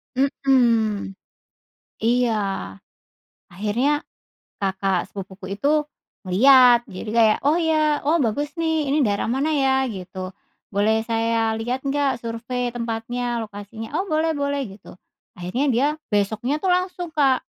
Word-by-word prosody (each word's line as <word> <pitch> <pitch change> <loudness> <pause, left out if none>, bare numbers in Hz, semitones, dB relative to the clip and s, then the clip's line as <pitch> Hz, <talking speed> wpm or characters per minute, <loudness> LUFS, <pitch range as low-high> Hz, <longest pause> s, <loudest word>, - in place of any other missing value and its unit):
Mhm, 235 -7 +2 0.9
iya. 240 -1 +2 1.1
Akhirnya 235 +11 0 0.6
kakak 190 -1 0
sepupuku 195 0 -8
itu 300 +3 +2 0.4
ngelihat, 245 +5 +6
jadi 195 +2 -7
kayak, 225 -1 +4
"Oh, 300 +4 +3
ya, 310 -3 +2
oh, 320 +1 +3
bagus 285 +6 -1
nih 320 -3 0
ini 290 +2 +2
daerah 205 -2 0
mana 270 +6 0
ya?" 270 -3 +2 0.2
Gitu, 185 -2 -6 0.4
"Boleh 215 +2 +2
saya 225 -1 0
lihat 250 +3 -2
nggak 275 -3 0
survei, 240 +2 -3
tempatnya, 240 +1 -3
lokasinya?" 215 +2 -9
"Oh, 385 - -1
boleh-boleh." 300 -3 0 0.2
Gitu. - - -15 0.4
Akhirnya 185 +11 -2
dia 265 +5 +3 0.2
besoknya 220 +8 0
tuh 375 - 0
langsung, 360 -1 -1
Kak, 275 -4 +2
240 Hz, 120 wpm, -22 LUFS, 215-285 Hz, 1.1 s, ngelihat